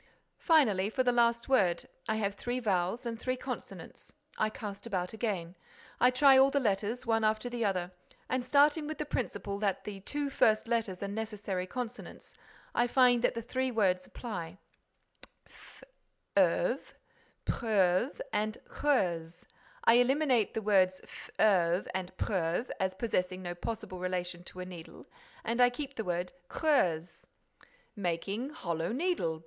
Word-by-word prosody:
"Finally, 215 Hz, -, +4 dB
for 255 Hz, +3 st, 0 dB
the 250 Hz, -, +3 dB
last 235 Hz, -1 st, +2 dB
word, 190 Hz, -10 st, +2 dB, 0.2 s
I 220 Hz, -, +2 dB
have 205 Hz, -2 st, -1 dB
three 245 Hz, +4 st, -3 dB
vowels 205 Hz, +2 st, 0 dB
and 230 Hz, -1 st, -4 dB
three 255 Hz, +2 st, -1 dB
consonants. 250 Hz, -, -8 dB, 0.2 s
I 215 Hz, -, +1 dB
cast 205 Hz, 0 st, -7 dB
about 185 Hz, -4 st, -2 dB
again, 195 Hz, -6 st, -3 dB, 0.4 s
I 250 Hz, -, +6 dB
try 265 Hz, +1 st, +6 dB
all 270 Hz, +1 st, +7 dB
the 280 Hz, -, +1 dB
letters, 215 Hz, 0 st, -1 dB
one 225 Hz, -1 st, +2 dB
after 215 Hz, +3 st, +1 dB
the 240 Hz, -1 st, -2 dB
other, 180 Hz, -3 st, -1 dB, 0.4 s
and, 255 Hz, -1 st, -1 dB
starting 290 Hz, +3 st, +4 dB
with 310 Hz, -1 st, -4 dB
the 300 Hz, -, -3 dB
principle 205 Hz, -7 st, -3 dB
that 200 Hz, -3 st, 0 dB
the 205 Hz, -2 st, -6 dB
two 285 Hz, +7 st, -3 dB
first 215 Hz, -3 st, +3 dB
letters 220 Hz, -5 st, -1 dB
are -, -, -2 dB
necessary 205 Hz, -3 st, -4 dB
consonants, 245 Hz, +3 st, -7 dB, 0.4 s
I 240 Hz, -, +2 dB
find 245 Hz, -1 st, +4 dB
that 230 Hz, -1 st, -1 dB
three 260 Hz, +1 st, 0 dB
words 190 Hz, -6 st, +1 dB
apply: 180 Hz, -7 st, -6 dB, 0.9 s
fleuve, -, -, -2 dB, 0.5 s
preuve 210 Hz, -, +1 dB
and 215 Hz, +1 st, 0 dB
creuse. 175 Hz, -, -1 dB, 0.4 s
I 230 Hz, -, +6 dB
eliminate 255 Hz, -3 st, +2 dB
the 220 Hz, -, -2 dB
words 185 Hz, -3 st, +3 dB
fleuve 180 Hz, -4 st, +1 dB
and 185 Hz, -1 st, -3 dB
preuve, 180 Hz, +3 st, -1 dB
as 190 Hz, 0 st, 0 dB
possessing 185 Hz, -4 st, -1 dB
no 175 Hz, -1 st, -3 dB
possible 185 Hz, 0 st, -5 dB
relation 180 Hz, -1 st, -3 dB
to 185 Hz, -, -8 dB
a -, -, -5 dB
needle, 175 Hz, -3 st, -10 dB, 0.4 s
and 235 Hz, +2 st, 0 dB
I 245 Hz, -, +7 dB
keep 275 Hz, +3 st, -6 dB
the 220 Hz, -, -3 dB
word 180 Hz, -1 st, -2 dB, 0.2 s
creuse." 175 Hz, -, 0 dB, 0.7 s
"Making 200 Hz, +6 st, -2 dB
'hollow 170 Hz, -, -3 dB
needle'! 250 Hz, -, -1 dB
215 Hz, 145 wpm, -31 LUFS, 185-245 Hz, 0.9 s, all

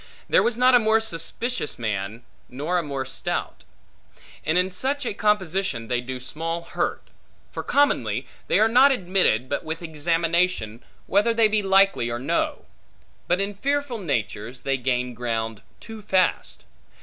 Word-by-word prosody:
There -, -, +4 dB
was 235 Hz, -1 st, 0 dB
not 255 Hz, +1 st, +5 dB
a 245 Hz, -, +8 dB
more 220 Hz, 0 st, +3 dB
suspicious 220 Hz, +1 st, -3 dB
man, 110 Hz, 0 st, -3 dB, 0.3 s
nor 150 Hz, +8 st, -1 dB
a -, -, 0 dB
more 140 Hz, -4 st, -4 dB
stout. 130 Hz, -, -4 dB, 0.8 s
And 160 Hz, +3 st, +1 dB
in 180 Hz, +1 st, +2 dB
such 270 Hz, +8 st, -1 dB
a 230 Hz, -, -1 dB
composition 190 Hz, -, 0 dB
they 125 Hz, -1 st, 0 dB
do 130 Hz, +1 st, -6 dB
small 165 Hz, +6 st, -4 dB
hurt. -, -, -3 dB, 0.4 s
For -, -, -4 dB
commonly 125 Hz, -, +1 dB, 0.2 s
they -, -, +3 dB
are 220 Hz, -, +5 dB
not 255 Hz, +5 st, +6 dB
admitted, 180 Hz, -, +1 dB
but 140 Hz, -, -2 dB
with 160 Hz, +2 st, -5 dB
examination, 165 Hz, -6 st, 0 dB, 0.2 s
whether 210 Hz, +4 st, +2 dB
they 225 Hz, -1 st, +5 dB
be 215 Hz, 0 st, +1 dB
likely 195 Hz, -10 st, +3 dB
or 120 Hz, -, -2 dB
no. 130 Hz, +3 st, -1 dB, 0.6 s
But 180 Hz, +2 st, +2 dB
in 200 Hz, +1 st, -1 dB
fearful 280 Hz, +2 st, -1 dB
natures 120 Hz, -, -3 dB
they 135 Hz, -1 st, 0 dB
gain 125 Hz, -1 st, -1 dB
ground 115 Hz, -2 st, -3 dB, 0.2 s
too 225 Hz, -1 st, -10 dB
fast. 190 Hz, -3 st, 0 dB
170 Hz, 155 wpm, -24 LUFS, 125-210 Hz, 0.8 s, a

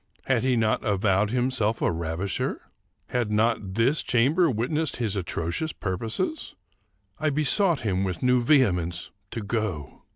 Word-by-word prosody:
Had 130 Hz, -3 st, +1 dB
he 130 Hz, -1 st, +2 dB
not 110 Hz, -1 st, +1 dB
avowed 100 Hz, 0 st, +2 dB
himself 120 Hz, -2 st, 0 dB
a -, -, +1 dB
ravisher? 85 Hz, +3 st, -2 dB, 0.5 s
Had 120 Hz, -4 st, -1 dB
not 105 Hz, -3 st, 0 dB
this 125 Hz, +7 st, +3 dB
chamber 145 Hz, +9 st, +3 dB
witnessed 140 Hz, +7 st, -1 dB
his 110 Hz, -4 st, -2 dB
atrocious 90 Hz, -, -3 dB
purposes? 115 Hz, -, -3 dB, 0.6 s
I 155 Hz, 0 st, +1 dB
besought 155 Hz, +3 st, +2 dB
him 95 Hz, -3 st, 0 dB
with 95 Hz, 0 st, -3 dB
new 125 Hz, -1 st, +4 dB
vehemence 90 Hz, -, +2 dB, 0.2 s
to 115 Hz, -, -4 dB
go. 100 Hz, -, -3 dB
115 Hz, 135 wpm, -26 LUFS, 95-130 Hz, 0.6 s, new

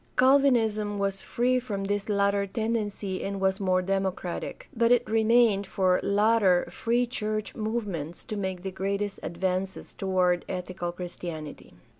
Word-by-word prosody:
Calvinism 235 Hz, -6 st, +3 dB
was 195 Hz, -1 st, -1 dB
free 250 Hz, +1 st, +1 dB
from 210 Hz, -6 st, -4 dB
this 205 Hz, +1 st, -2 dB
latter 200 Hz, 0 st, +2 dB
tendency 210 Hz, -3 st, -2 dB
and 195 Hz, 0 st, -3 dB
was 190 Hz, +1 st, +1 dB
more 185 Hz, -2 st, +2 dB
democratic; 190 Hz, -2 st, -3 dB
but 230 Hz, 0 st, +3 dB
it 245 Hz, 0 st, +4 dB
remained 220 Hz, -2 st, +3 dB
for 185 Hz, -2 st, +2 dB
later 205 Hz, -3 st, +3 dB
Free 235 Hz, +6 st, +1 dB
church 215 Hz, -3 st, -3 dB
movements 210 Hz, -8 st, -3 dB
to 215 Hz, -, -5 dB
make 190 Hz, -3 st, -3 dB
the 190 Hz, -, -3 dB
greatest 200 Hz, +2 st, -2 dB
advances 185 Hz, +2 st, -3 dB
toward 185 Hz, -2 st, +1 dB
ethical 180 Hz, -1 st, -4 dB
Christianity. 175 Hz, -3 st, -7 dB
200 Hz, 135 wpm, -27 LUFS, 185-220 Hz, -, it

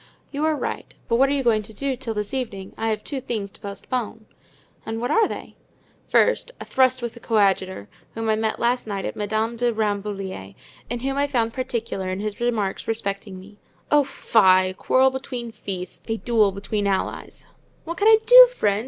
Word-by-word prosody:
"You 290 Hz, +1 st, -3 dB
are 315 Hz, -1 st, +2 dB
right; -, -, -5 dB
but 230 Hz, -, +2 dB
what 270 Hz, +2 st, +4 dB
are -, -, +1 dB
you 280 Hz, -1 st, 0 dB
going 225 Hz, -3 st, +3 dB
to 215 Hz, +1 st, -11 dB
do 275 Hz, +5 st, -1 dB
until 245 Hz, -3 st, -4 dB
this 210 Hz, +2 st, -3 dB
evening? 215 Hz, -8 st, -4 dB
I 225 Hz, -, -2 dB
have 215 Hz, -1 st, -2 dB
two 275 Hz, -3 st, -4 dB
things 215 Hz, -6 st, -4 dB
to -, -, -18 dB
postpone." 220 Hz, +2 st, -5 dB, 0.6 s
"And 225 Hz, 0 st, -4 dB
what 245 Hz, -, -2 dB
are 450 Hz, -2 st, +4 dB
they?" -, -, -7 dB, 0.6 s
"First, -, -, +3 dB
a -, -, -7 dB
thrust 255 Hz, -1 st, +2 dB
with 235 Hz, -, -3 dB
the 235 Hz, -, -12 dB
coadjutor, 195 Hz, -, +1 dB, 0.3 s
whom 225 Hz, 0 st, -3 dB
I 220 Hz, -, +3 dB
met 220 Hz, 0 st, -1 dB
last 240 Hz, 0 st, 0 dB
night 200 Hz, -2 st, -3 dB
at -, -, -4 dB
Madame 220 Hz, +2 st, -1 dB
de 240 Hz, 0 st, +1 dB
Rambouillet's 200 Hz, -, -3 dB, 0.3 s
and 240 Hz, +1 st, -4 dB
whom 270 Hz, +1 st, -1 dB
I 285 Hz, 0 st, +2 dB
found 230 Hz, -5 st, 0 dB
particular 230 Hz, -7 st, -3 dB
in 185 Hz, +1 st, -3 dB
his 210 Hz, +1 st, -4 dB
remarks 220 Hz, -5 st, -1 dB
respecting 200 Hz, -3 st, -3 dB
me." 205 Hz, +2 st, -15 dB, 0.3 s
"Oh, 295 Hz, -1 st, +6 dB
fie—a 185 Hz, -8 st, +3 dB
quarrel 260 Hz, +7 st, +3 dB
between 255 Hz, -3 st, -5 dB
priests, 195 Hz, -4 st, -6 dB
a 225 Hz, 0 st, -1 dB
duel 220 Hz, -4 st, +2 dB
between 200 Hz, +1 st, -2 dB
allies!" 195 Hz, -1 st, -3 dB, 0.4 s
"What 335 Hz, +1 st, -6 dB
can 410 Hz, -, +2 dB
I 445 Hz, 0 st, +8 dB
do, -, -, +10 dB
friend? 205 Hz, -, +1 dB
225 Hz, 195 wpm, -23 LUFS, 200-255 Hz, 0.6 s, do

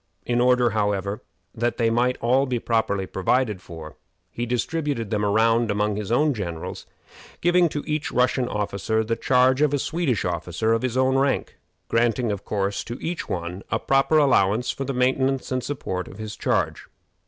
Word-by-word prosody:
In 120 Hz, 0 st, +1 dB
order, 125 Hz, -1 st, +4 dB
however, 100 Hz, -1 st, -1 dB, 0.3 s
that 120 Hz, 0 st, -1 dB
they 115 Hz, -2 st, +2 dB
might 125 Hz, +2 st, +1 dB
all 130 Hz, +4 st, +3 dB
be 125 Hz, -1 st, 0 dB
properly 110 Hz, -4 st, 0 dB
provided 105 Hz, +2 st, 0 dB
for, 80 Hz, -3 st, -10 dB, 0.3 s
he 120 Hz, +1 st, -4 dB
distributed 125 Hz, -2 st, -2 dB
them 105 Hz, -1 st, 0 dB
around 115 Hz, +3 st, +3 dB
among 105 Hz, 0 st, 0 dB
his 105 Hz, +1 st, -4 dB
own 150 Hz, +4 st, +3 dB
generals, 85 Hz, -8 st, -6 dB, 0.5 s
giving 175 Hz, 0 st, +3 dB
to 145 Hz, -1 st, -4 dB
each 155 Hz, -1 st, -2 dB
Russian 125 Hz, 0 st, +2 dB
officer 105 Hz, +1 st, -1 dB
the 115 Hz, +1 st, -1 dB
charge 130 Hz, +2 st, +3 dB
of 145 Hz, -1 st, +3 dB
a -, -, +1 dB
Swedish 150 Hz, -, -1 dB
officer 90 Hz, +6 st, -1 dB
of 115 Hz, -, +1 dB
his 130 Hz, -1 st, -2 dB
own 130 Hz, +1 st, +3 dB
rank, 135 Hz, 0 st, -1 dB, 0.3 s
granting, 115 Hz, 0 st, +1 dB
of 100 Hz, -1 st, -4 dB
course, 100 Hz, -1 st, -2 dB
to 120 Hz, -, -6 dB
each 170 Hz, +1 st, -4 dB
one 90 Hz, +1 st, -4 dB
a -, -, +1 dB
proper 135 Hz, +3 st, +2 dB
allowance 125 Hz, -6 st, +3 dB
for 135 Hz, -, -5 dB
the 135 Hz, -, -2 dB
maintenance 130 Hz, +1 st, +1 dB
and 130 Hz, -1 st, -1 dB
support 95 Hz, -10 st, -4 dB
of 95 Hz, -, -11 dB
his 110 Hz, -1 st, -6 dB
charge. -, -, -1 dB
120 Hz, 175 wpm, -24 LUFS, 105-130 Hz, 0.5 s, order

